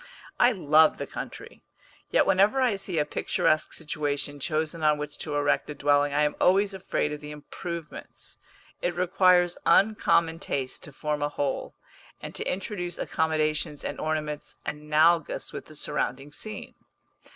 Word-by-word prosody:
I 245 - +6
love 160 - +4
the - - -4
country, - - -8 0.5
yet - - +4
whenever 200 +8 +4
I 250 -5 +3
see 195 -3 -4
a 150 - +2
picturesque 155 +1 +1
situation 145 -2 -3
chosen 155 +2 -2
on 150 -1 +4
which 150 0 -5
to 150 -2 -4
erect 145 +1 +1
a 150 - -5
dwelling 145 0 +3
I 150 +1 +2
am 150 - +1
always 195 +2 +4
afraid 190 -5 -1
of 150 - -7
the 150 - -8
improvements. 160 +2 -8 0.4
It 175 - -1
requires 180 -1 +3
uncommon 170 -5 +3
taste 130 -5 -3
to - - -11
form 150 +2 -3
a 145 - +1
whole, 145 -2 -3 0.4
and - - -8
to - - -2
introduce 180 -2 -4
accommodations 155 -2 0
and - - -4
ornaments 150 -1 -3
analogous 150 +2 +1
with - - -7
the 155 - -13
surrounding 145 -1 -3
scene. 215 +8 -7
155 Hz, 150 wpm, -27 LUFS, 150-175 Hz, 0.5 s, I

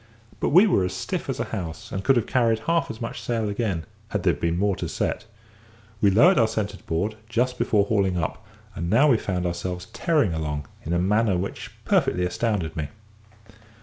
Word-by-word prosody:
But - - +1
we 180 +8 +7
were 185 - +3
as 90 - -2
stiff - - -4
as - - -2
a - - +1
house, 80 -4 -5
and 95 - -3
could 135 - +4
have 120 - +2
carried 115 -3 +2
half 165 +6 +1
as 110 - -6
much 115 - -5
sail 115 -3 -1
again, 100 -6 -2 0.2
had 105 -4 -2
there 90 -2 +4
been 85 +3 -1
more 100 +1 +1
to - - -4
set. - - -2 0.8
We 100 - +5
lowered 150 - +6
our 115 - +5
centre 105 -3 -3
board 100 +7 -1
just 125 +2 0
before 105 -2 +3
hauling 100 -4 +1
up, 85 +6 -3 0.3
and 85 +1 -4
now 125 +9 +5
we 120 - +5
found 90 -2 -2
ourselves 90 +1 -3
tearing 150 - +2
along, 75 -2 -3 0.2
in 80 - -2
a - - +2
manner 100 +2 +2
which 95 +3 -4 0.2
perfectly 90 0 +2
astounded 90 -4 -1
me. 75 -2 -2
100 Hz, 200 wpm, -24 LUFS, 90-115 Hz, 0.8 s, we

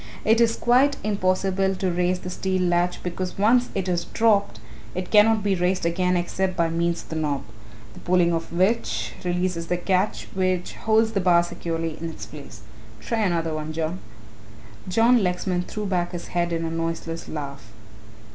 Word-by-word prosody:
It 225 +2 +4
is 230 -1 +3
quite 260 +4 +3
impossible 190 -1 +1
to 185 -1 -1
raise 180 +1 0
the 180 - -6
steel 185 0 -1
latch 175 0 +1
because 180 +1 -4
once 240 +5 +3
it 190 -2 -1
is 175 -1 0
dropped 210 - +2 0.4
it 185 0 -4
cannot 215 0 +5
be 200 -1 +2
raised 180 0 0
again 180 +2 +1
except 185 +1 -1
by 170 -1 +2
means 170 +1 0
of - - -19
the 160 - -4
knob, 145 -3 -1 0.5
the - - -12
pulling 175 -1 +2
of 165 0 -3
which 165 - 0
releases 180 -1 -1
the 180 - 0
catch 185 +3 0
which 185 -1 -1
holds 220 0 +2
the 200 -3 0
bar 175 -1 +5
securely 165 -2 -4
in 165 - -3
its 160 - -8
place. 140 -8 -11 0.4
Try 230 - -2
another 170 -6 0
one, 155 0 -4
John." 165 +3 -2 0.9
John 230 +5 +4
Lexman 180 -1 0
threw 210 -1 -4
back 180 -3 -1
his 175 -1 -6
head 175 -1 0
in 165 0 -1
a 165 - -3
noiseless 165 0 -4
laugh. 140 -5 -6
180 Hz, 175 wpm, -24 LUFS, 170-195 Hz, 0.9 s, cannot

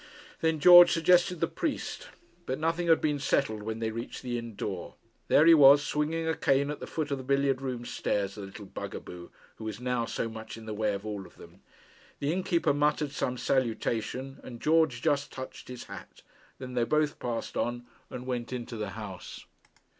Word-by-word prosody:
Then 160 -1 +1
George 175 +3 +9
suggested 175 +1 +3
the 165 - +3
priest; 330 - -4 0.4
but 130 - -1
nothing 165 +2 -1
had 165 -1 +5
been 150 -2 0
settled 135 -6 0
when 110 +1 -4
they 110 -1 -2
reached 115 +4 -6
the 125 -1 -3
inn 115 -2 -5
door. 95 -3 -5 0.3
There 150 - +5
he 165 - +9
was, 145 -1 +8
swinging 160 +2 -1
a 160 - +2
cane 140 +1 +2
at 150 - -6
the - - -7
foot 155 -2 -3
of 140 - -1
the - - -7
billiard 140 0 +1
room 125 -3 -4
stairs 100 -4 -1
the 105 - -8
little 100 +1 -9
bug - - -7
a - - -4
boo, 90 -1 -10 0.3
who 110 - -8
was 110 -1 -5
now 125 -1 -1
so 115 - -3
much 110 0 -8
in 110 - -11
the 110 - -5
way 105 -1 0
of 100 +2 -7
all 105 -3 -5
of - - -21
them! - - -15 0.6
The 145 +3 -1
innkeeper 180 -4 +1
muttered 150 0 +1
some 125 -3 -2
salutation, 130 +1 -1
and 120 -2 -9
George 155 -5 +2
just 145 0 +1
touched 130 0 -8
his 125 -1 -7
hat. - - -11 0.3
Then 125 -1 -8
they 120 -1 +1
both 150 +4 +1
passed 120 -2 -4
on, 120 0 -2 0.2
and 125 0 -7
went 125 -2 -3
into 120 -2 -5
the 105 -2 -3
house. 100 -4 -8
130 Hz, 205 wpm, -29 LUFS, 115-150 Hz, 0.6 s, George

